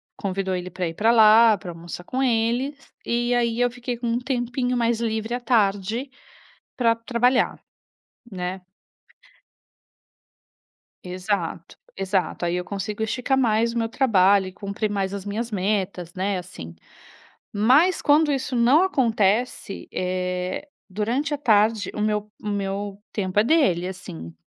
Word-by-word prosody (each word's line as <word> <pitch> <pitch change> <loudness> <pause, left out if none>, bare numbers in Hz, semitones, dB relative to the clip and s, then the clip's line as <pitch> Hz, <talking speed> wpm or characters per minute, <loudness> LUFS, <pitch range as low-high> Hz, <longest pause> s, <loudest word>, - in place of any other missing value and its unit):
convidou 190 -1 -2
ele 180 0 -4
para 180 -1 -3
ir 165 - -5
para 220 +7 +3
lá, 220 -1 +7
para 180 -2 -8
almoçar 170 +1 -8
com 260 +8 -3
eles, 245 +3 +1 0.3
e 240 +1 0
aí 235 -1 +1
eu 245 0 +2
fiquei 245 0 -5
com 240 0 -4
um 230 +1 +1
tempinho 245 0 -1
mais 235 -1 +1
livre 220 0 -2
à 245 - -1
tarde, 220 +1 0 0.7
para 230 -2 +3
trabalhar, 240 +2 +1 0.7
né. 185 -1 -4 2.5
Exato, 180 -2 -3 0.2
exato. 190 -3 -1
Aí 170 - 0
eu 180 - -2
consigo 205 +3 -4
esticar 255 +4 0
mais 230 -2 +2
o - - -3
meu 225 -1 0
trabalho 200 -6 +3
e 185 - -9
cumprir 200 +2 -3
mais 195 -1 -2
as 200 -1 -6
minhas 220 +3 -3
metas, 190 -3 -2
né, 190 +1 -1
assim. 125 - -9 0.8
Mas 265 - +4
quando 295 +1 +4
isso 265 -1 -2
não 250 +8 +5
acontece, 225 - 0
eh, 180 +5 -2 0.2
durante 235 +10 -1
a 290 - -1
tarde, 215 -3 +2
o - - -4
meu 210 0 -1
o - - -7
meu 200 0 -3 0.2
tempo 190 -2 -3
é - - +5
dele, 220 - +2
assim. 85 - -8
215 Hz, 145 wpm, -23 LUFS, 190-240 Hz, 2.5 s, lá